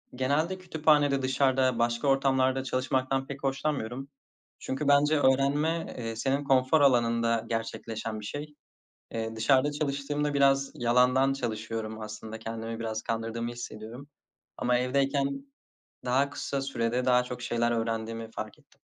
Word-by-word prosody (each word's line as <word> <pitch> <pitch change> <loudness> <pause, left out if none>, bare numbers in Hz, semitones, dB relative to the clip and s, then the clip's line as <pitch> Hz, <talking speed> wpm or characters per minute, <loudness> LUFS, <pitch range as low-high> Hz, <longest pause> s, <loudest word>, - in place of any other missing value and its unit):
Genelde 145 +8 0
kütüphanede, 150 -6 +2
dışarıda 130 -1 +2
başka 120 +4 +1
ortamlarda 135 -1 +2
çalışmaktan 130 +1 -1
pek 140 0 -8
hoşlanmıyorum 135 -2 -2 0.5
çünkü 140 +2 -3
bence 145 +2 +4
öğrenme, 145 +5 +2
eee, 115 -2 -4
senin 135 +5 0
konfor 135 +2 +3
alanında 115 -3 +3
gerçekleşen 115 -1 -4
bir 105 - -8
şey. 150 +6 -6 0.6
Eee, 115 0 -3
dışarıda 130 +5 +3
çalıştığımda 145 0 -2
biraz 135 0 +3
yalandan 125 +3 +3
çalışıyorum 110 -3 -4
aslında, 110 +1 -7
kendimi 115 0 -5
biraz 110 -1 -3
kandırdığımı 115 +1 -3
hissediyorum. 120 +2 -8 0.5
Ama 125 0 +1
evdeyken 135 +2 +1 0.8
daha 135 +3 +2
kısa 140 -1 -3
sürede 125 -2 -1
daha 125 -1 +4
çok 125 0 -7
şeyler 120 0 0
öğrendiğimi 115 0 -2
fark 110 -1 -7
ettim. - - -28
130 Hz, 125 wpm, -28 LUFS, 115-140 Hz, 0.8 s, bence